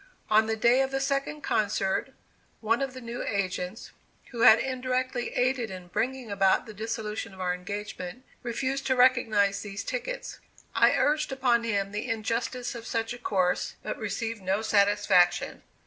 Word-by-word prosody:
On 220 +1 +5
the 220 - 0
day 240 +4 +4
of 265 - +1
the 270 0 -1
second 275 +2 -1
concert, 200 -5 0 0.5
one 230 +3 +1
of 270 -1 -2
the 255 - -7
new 235 0 -5
agents, 190 0 -3 0.4
who 235 -2 -4
had 230 -2 +9
indirectly 255 -1 -2
aided 250 -2 +1
in 185 -2 -9
bringing 250 +3 -2
about 195 -1 +3
the 220 - -9
dissolution 215 -1 -4
of - - -15
our 180 -1 0
engagement, 200 +4 -6 0.2
refused 265 +3 -2
to 260 - +2
recognize 220 -6 +3
these 200 -1 -6
tickets. - - -4 0.3
I - - +5
urged 300 0 +1
upon 245 -3 +2
him 200 -3 -1
the 210 +4 -4
injustice 230 +3 -2
of 235 -1 -8
such 225 0 -2
a 245 - -9
course, 185 -6 0
but - - -4
received 225 -2 -3
no 190 +3 0
satisfaction. 205 -4 +3
225 Hz, 165 wpm, -28 LUFS, 200-255 Hz, 0.5 s, had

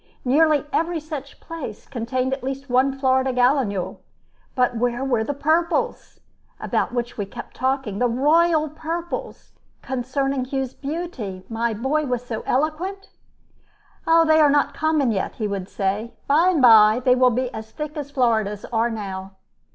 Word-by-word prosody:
Nearly 300 +3 +3
every 335 +1 0
such 295 -3 -8
place 305 -10 -8
contained 255 +1 -2
at 270 - -4
least 270 0 -5
one 265 +2 +2
Florida 260 -1 +2
gallinule; 245 -6 +1 0.6
but 250 -1 +2
where 245 +2 -1
were 240 -5 +1
the 285 +5 -3
"purples," 320 +4 0 0.4
about - - -1
which 240 -1 -4
we 205 - -1
kept 240 +4 -10
talking, 260 -5 -1
the 245 - +3
"royal 310 +6 +3
purples," 325 +3 -6 0.3
concerning 265 +1 -2
whose 265 -1 -3
beauty 275 - -5
my 230 0 -1
boy 280 +7 0
was 245 -1 -2
so 225 -3 -4
eloquent? 340 +8 -1 1.0
"They 325 -1 +5
are 300 -2 +6
not 290 +1 +2
common 310 -5 +1
yet," 195 -3 -2
he 215 - -2
would 195 -2 -4
say. 205 +4 -2
"By 310 +5 +4
and 325 -7 +2
by 220 -1 +7
they 250 - +6
will 255 0 +4
be 250 +1 -2
as 220 0 -7
thick 300 +6 -6
as 290 -2 -5
Floridas 220 -7 0
are 230 +1 +2
now." 195 -3 -6
260 Hz, 155 wpm, -22 LUFS, 230-300 Hz, 1.0 s, by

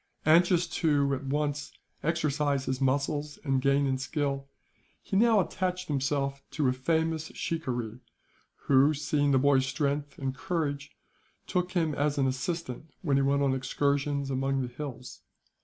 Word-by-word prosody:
Anxious 175 +2 +5
to, 145 -4 +1
at 135 +1 -3
once, 145 +1 -1 0.3
exercise 150 -3 0
his 130 +1 -2
muscles 145 +2 0
and 135 -3 +1
gain 140 +1 +3
in 130 -1 0
skill, 140 0 -2 0.5
he - - -5
now 225 +1 +5
attached 185 -1 -2
himself 140 -1 -1
to 150 -4 0
a 125 - +3
famous 160 +4 0
shikaree 125 -8 -3 0.7
who, 140 +3 +5
seeing 145 0 +1
the 135 - +4
boy's 135 0 +3
strength 145 0 -2
and 135 -1 -2
courage, 145 -4 -2 0.6
took 180 0 -1
him 165 -4 +1
as 145 +1 0
an 135 - +2
assistant 130 +3 -3
when 145 -5 +2
he - - +3
went 140 +1 +2
on 135 -1 +2
excursions 140 +1 0
among 135 0 0
the 120 -1 -6
hills. 130 -2 -7
140 Hz, 150 wpm, -29 LUFS, 135-155 Hz, 0.7 s, Anxious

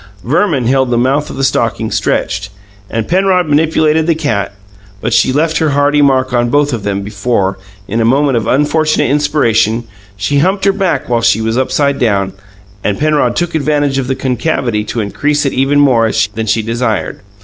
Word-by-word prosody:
Verman 150 - +1
held 130 +1 +2
the 120 - +1
mouth 135 +5 0
of - - -7
the 135 - -3
stocking 135 - 0
stretched, 95 +1 -1 0.4
and 115 -1 -3
Penrod 185 0 +2
manipulated 155 +1 +2
the 165 - +2
cat; 125 -11 -2 0.5
but 120 - -2
she 130 - +3
left 155 +4 0
her 160 -2 +1
hearty 145 +1 +3
mark 130 -2 +2
on 120 -1 +1
both 145 +1 +1
of 115 - -3
them 100 -1 -2
before, 100 -2 -1 0.3
in 115 +3 -1
a - - +2
moment 135 +3 +2
of 115 -2 -1
unfortunate 150 0 +1
inspiration, 120 -6 +1 0.3
she 105 +9 0
humped 190 +5 +1
her 195 - +3
back 190 -8 -1
while 120 -1 0
she 110 - +2
was 110 +1 -1
upside 140 +2 0
down, 100 -5 0 0.5
and 100 -1 -1
Penrod 150 -5 +1
took 175 -1 -2
advantage 145 -2 0
of 130 - -3
the 135 - -1
concavity 125 -4 -1
to 115 - -3
increase 145 +8 -1
it 135 - 0
even 135 +2 +2
more 120 -6 +3 0.2
than 110 0 -4
she 110 +2 +1
desired. 115 0 -2
135 Hz, 185 wpm, -13 LUFS, 115-150 Hz, 0.5 s, she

